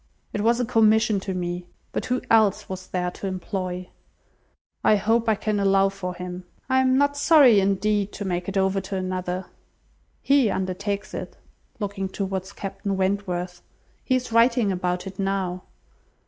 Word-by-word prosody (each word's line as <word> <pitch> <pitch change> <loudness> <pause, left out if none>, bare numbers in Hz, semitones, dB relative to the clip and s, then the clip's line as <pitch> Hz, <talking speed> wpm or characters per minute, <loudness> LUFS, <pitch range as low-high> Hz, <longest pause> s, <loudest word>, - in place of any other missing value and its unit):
It 205 - -1
was 235 +2 +3
a 245 - +1
commission 220 -2 +3
to 190 -1 -4
me! 175 0 -3 0.2
But - - -3
who 250 0 -1
else 215 -3 +4
was 185 -1 -7
there 180 -1 -2
to 195 - -6
employ? 185 -1 -4 0.9
I 215 - +5
hope 225 +3 +1
I 220 - +4
can 210 0 -1
allow 195 0 +4
for 185 -2 -5
him. 180 0 -6 0.2
I 260 0 +3
am 260 0 +3
not 285 +1 +2
sorry, 285 -7 +6
indeed, 200 +1 +1
to 205 - -5
make 180 0 -2
it 195 - -3
over 190 0 +2
to 195 +1 -5
another. 185 0 -3 0.8
He 275 -5 +4
undertakes 195 +2 -3
it;" - - -6 0.4
(looking 200 -2 -3
towards 190 -1 -4
Captain 195 0 -4
Wentworth,) 185 -2 -2 0.4
"he 255 - +1
is 255 -2 -2
writing 230 -2 +4
about 180 -1 -2
it 190 0 -9
now." 190 -2 -2
195 Hz, 160 wpm, -24 LUFS, 185-215 Hz, 0.9 s, sorry